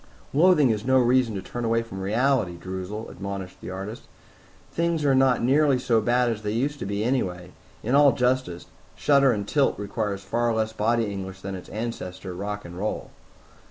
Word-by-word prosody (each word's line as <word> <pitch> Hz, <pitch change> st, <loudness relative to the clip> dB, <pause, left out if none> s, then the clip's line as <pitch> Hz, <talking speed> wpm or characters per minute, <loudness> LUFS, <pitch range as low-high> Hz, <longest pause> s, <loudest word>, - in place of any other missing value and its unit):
"Loathing 150 Hz, -4 st, +5 dB
is 105 Hz, -1 st, -2 dB
no 130 Hz, +2 st, +3 dB
reason 125 Hz, -2 st, +3 dB
to 95 Hz, -, -4 dB
turn 120 Hz, +5 st, -5 dB
away 115 Hz, 0 st, +1 dB
from 95 Hz, -4 st, -8 dB
reality, 110 Hz, -2 st, +1 dB
Droozle," 95 Hz, +4 st, -6 dB
admonished 95 Hz, -1 st, -6 dB
the -, -, -7 dB
artist. 95 Hz, +4 st, -7 dB, 0.6 s
"Things 170 Hz, -2 st, 0 dB
are 140 Hz, -, +4 dB
not 130 Hz, -2 st, +3 dB
nearly 140 Hz, +2 st, +4 dB
so 115 Hz, -3 st, +2 dB
bad 120 Hz, +3 st, +2 dB
as 110 Hz, -1 st, -4 dB
they 105 Hz, -1 st, -2 dB
used 140 Hz, +5 st, -1 dB
to -, -, -4 dB
be 100 Hz, +1 st, -2 dB
anyway. 90 Hz, -8 st, -1 dB, 0.3 s
In 120 Hz, -, -1 dB
all 140 Hz, 0 st, +7 dB
justice, 125 Hz, -9 st, 0 dB, 0.3 s
shudder 140 Hz, -2 st, +4 dB
and 105 Hz, -3 st, -2 dB
tilt 140 Hz, +2 st, +2 dB
requires 100 Hz, -1 st, -3 dB
far 120 Hz, +3 st, 0 dB
less 110 Hz, 0 st, -1 dB
body 115 Hz, +2 st, +1 dB
English 95 Hz, -2 st, -6 dB
than 100 Hz, 0 st, -5 dB
its 95 Hz, -, -8 dB
ancestor, 95 Hz, -4 st, -5 dB
rock 100 Hz, +3 st, -5 dB
and 85 Hz, 0 st, -9 dB
roll." 105 Hz, +2 st, -3 dB
110 Hz, 185 wpm, -25 LUFS, 100-130 Hz, 0.6 s, all